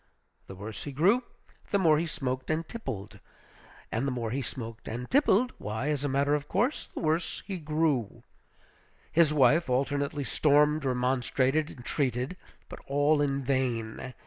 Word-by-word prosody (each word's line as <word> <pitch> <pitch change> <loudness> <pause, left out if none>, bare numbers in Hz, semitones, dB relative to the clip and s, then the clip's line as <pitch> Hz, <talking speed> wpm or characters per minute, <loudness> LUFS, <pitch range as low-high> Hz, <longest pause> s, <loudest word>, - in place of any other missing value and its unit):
The 95 - -9
worse 105 +2 -7
he 145 - -4
grew, 200 - +3 0.5
the 200 - +2
more 160 -5 +4
he 170 - -1
smoked 130 -4 -3
and 155 +1 -1
tippled; 105 - -6 0.7
and 120 +5 -1
the - - 0
more 120 -3 -3
he 135 +3 -1
smoked 115 -1 -7
and 120 +3 -4
tippled, 255 -3 +3
why, 110 +7 -3
as 145 -2 -1
a 145 - 0
matter 140 +2 +2
of 145 -1 -1
course, 240 - 0
the - - -7
worse 160 +1 -1
he 190 -3 -4
grew. 150 -7 0 0.9
His 165 -2 +4
wife 150 +2 +4
alternately 140 +3 0
stormed, 150 +2 +3
remonstrated, 130 +3 +1
entreated; 125 +3 -2 0.3
but - - -9
all 145 +2 +3
in 140 -1 0
vain. 125 -2 -2
140 Hz, 155 wpm, -29 LUFS, 125-155 Hz, 0.9 s, more